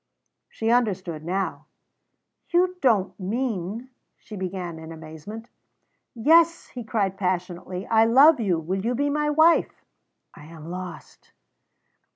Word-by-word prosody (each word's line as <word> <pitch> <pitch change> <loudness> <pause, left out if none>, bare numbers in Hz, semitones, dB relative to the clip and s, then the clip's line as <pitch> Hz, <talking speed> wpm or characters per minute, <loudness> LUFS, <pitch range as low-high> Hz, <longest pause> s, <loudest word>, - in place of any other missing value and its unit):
She 225 0 -1
understood 190 -10 0
now. 190 +4 -3 0.8
"You 360 +1 +2
don't 215 -8 +1
mean 220 +2 -3
" - - -53
she 215 - -11
began, 180 -3 -5
in 160 0 -9
amazement. 165 +8 -9 0.7
"Yes," 330 +7 +3
he 245 - -7
cried 200 -4 -1
passionately. 180 0 -3
"I 225 0 +4
love 275 +6 +6
you. 190 -7 +1
Will 185 +4 -3
you 240 +2 0
be 285 +3 0
my 300 0 0
wife?" 315 +3 +3 0.5
("I 150 - -14
am 165 0 -10
lost!") 180 -1 -9
200 Hz, 130 wpm, -24 LUFS, 180-250 Hz, 0.8 s, love